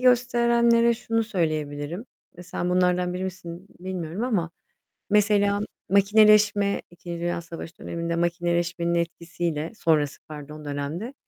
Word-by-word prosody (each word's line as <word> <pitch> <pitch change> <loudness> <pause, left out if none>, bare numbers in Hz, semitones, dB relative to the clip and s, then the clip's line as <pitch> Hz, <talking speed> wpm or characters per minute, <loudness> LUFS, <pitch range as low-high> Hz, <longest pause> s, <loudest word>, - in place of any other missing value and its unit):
gösterenlere 235 -1 +4
şunu 225 -1 -1
söyleyebilirim, 155 -2 -2 0.3
eee, 180 - -9
sen 180 0 -3
bunlardan 180 0 +2
biri 185 +1 -3
misin 180 -1 -7
bilmiyorum 185 +2 -4
ama 190 -9 0 0.6
mesela 205 -1 +3 0.3
makineleşme, 205 0 +4
2.Dünya 170 0 -4
Savaşı 165 0 -9
döneminde 170 0 -3
makineleşmenin 170 0 0
etkisiyle, 170 -2 -2
sonrası 150 -3 +1
pardon 150 0 -9
dönemde, 145 - -4
175 Hz, 105 wpm, -25 LUFS, 170-210 Hz, 0.6 s, gösterenlere